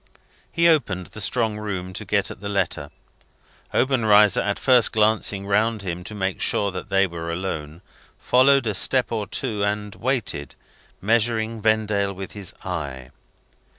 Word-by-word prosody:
He 170 -1 +3
opened 110 - +2
the 110 - -6
strong 110 0 0
room 95 -3 -5
to 100 - -6
get 100 0 0
at - - -11
the 100 - -4
letter. 90 -7 -1 0.8
Obenreizer, 110 -6 +4
after 100 0 -2
first 125 -4 +4
glancing 105 -2 +2
round 110 +1 +1
him 90 -1 -4
to 105 - -7
make 95 -2 -2
sure 100 -1 +1
that 90 -1 -7
they 95 0 +3
were 85 -2 -5
alone, 85 -2 -5 0.3
followed 135 +1 +4
a 110 - 0
step 125 +5 +2
or 110 -3 -2
two 110 -6 -2
and 105 0 -2
waited, 115 - -2 0.5
measuring 110 +1 0
Vendale 105 -2 +1
with 95 0 -8
his 100 -3 -6
eye. 70 -8 -5
105 Hz, 150 wpm, -23 LUFS, 95-110 Hz, 0.8 s, Obenreizer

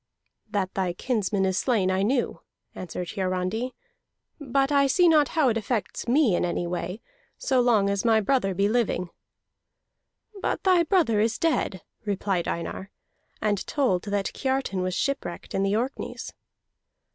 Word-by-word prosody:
"That 190 -2 -1
thy 185 -2 -1
kinsman 205 -2 0
is 190 0 +1
slain 210 -8 +1
I 190 0 +1
knew," 240 +5 0 0.3
answered 180 -1 -5
Hiarandi, 190 +6 -2 0.6
"but 275 0 0
I 280 -1 +4
see 350 +7 +4
not 305 -3 +5
how 290 -5 +5
it 225 - +1
affects 225 +1 -3
me 245 - +4
in - - 0
any 175 0 -1
way, 180 +4 -4 0.4
so 260 -2 +2
long 225 -5 +3
as 200 -1 0
my 225 -2 +4
brother 205 -3 +1
be 200 +2 +2
living." 210 -6 0 1.3
"But - - -1
thy 370 -2 +5
brother 320 - +2
is 220 +2 +1
dead," 310 - 0 0.2
replied 195 -4 -1
Einar, 170 +3 -4 0.5
and 205 -2 +1
told 235 -11 +1
that 200 -1 -1
Kiartan 265 -8 -1
was 185 0 -1
shipwrecked 275 -8 -3
in 195 - 0
the 195 +1 +1
Orkneys. 250 +5 -4
210 Hz, 150 wpm, -26 LUFS, 190-265 Hz, 1.3 s, not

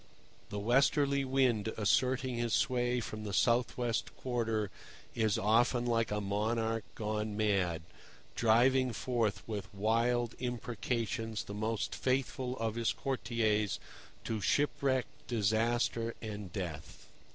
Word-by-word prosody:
The 105 - -4
Westerly 140 +5 +3
Wind 130 -5 +2
asserting 125 +4 +2
his 120 -2 +1
sway 125 -1 +1
from 110 -1 -6
the 105 -2 -4
south 120 +5 +2
west 120 -2 -1
quarter 115 -5 -1 0.4
is 110 -3 +1
often 120 +4 +3
like 115 -2 +1
a 105 - -1
monarch 110 +2 0
gone 105 -1 -2
mad, 95 -6 +1 0.5
driving 125 +3 +4
forth 115 -3 -1
with 105 -3 -5
wild 115 +4 +1
imprecations 115 -2 -2
the 100 - -8
most 110 +1 -2
faithful 130 -1 -1
of 115 -1 -1
his 115 0 0
courtiers 110 -6 0 0.4
to 110 -2 -2
shipwreck, 135 - +1 0.2
disaster, 115 +1 +1
and 105 -4 -6
death. 85 -6 -6
115 Hz, 120 wpm, -33 LUFS, 105-125 Hz, 0.5 s, driving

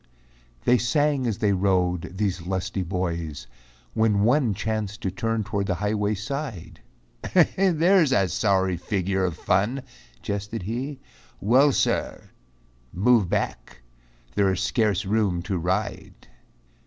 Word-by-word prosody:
They 125 - +4
sang 140 +3 +1
as 110 -4 -1
they 105 -2 +2
rode, 90 -2 0
these 95 -3 -1
lusty 95 +1 -2
boys, 85 -5 -3 0.5
When 110 -2 +2
one 120 -2 +3
chanced 110 +1 -3
to 95 - -2
turn 115 +2 -1
toward 100 -2 -2
the 90 - 0
highway's 105 +1 -1
side, 135 - -6 0.7
"There's 180 -3 +3
a 100 -7 +3
sorry 95 -3 +1
figure 95 +2 -1
of 90 -3 -1
fun," 110 +11 0 0.4
jested 100 +1 -4
he, 130 +7 -4 0.4
"Well, 130 +7 +4
Sirrah! - - -1 0.6
move 105 0 +3
back, - - -3 0.5
there 100 -1 +2
is 95 - -2
scarce 105 -1 +1
room 100 -4 0
to 95 -1 -2
ride." 95 +5 -3
100 Hz, 125 wpm, -25 LUFS, 95-115 Hz, 0.7 s, They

